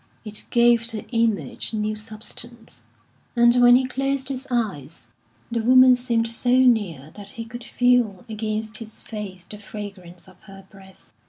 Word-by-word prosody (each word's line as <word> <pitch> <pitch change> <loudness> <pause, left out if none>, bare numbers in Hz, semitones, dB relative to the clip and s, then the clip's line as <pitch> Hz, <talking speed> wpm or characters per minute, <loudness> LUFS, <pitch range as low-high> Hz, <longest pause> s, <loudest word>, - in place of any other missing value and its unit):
It 215 0 -6
gave 235 -1 +4
the 220 -3 -6
image 230 -2 -1
new 215 0 -1
substance; 225 +2 -8 0.5
and 235 +1 +5
when 245 0 +8
he 260 +1 +3
closed 270 +1 -1
his 265 0 -4
eyes, 165 - -3 0.4
the 230 -1 0
woman 255 +2 +7
seemed 235 -2 0
so 245 +2 +1
near 205 - +2
that 205 -1 -11
he 230 - -5
could 240 +1 -9
feel 245 -7 +1
against 215 0 -4
his 220 -2 -11
face 195 -5 -8
the 210 +2 -11
fragrance 195 -4 -9
of 185 -1 -18
her 195 -1 -13
breath. 190 - -18
225 Hz, 155 wpm, -23 LUFS, 205-245 Hz, 0.5 s, when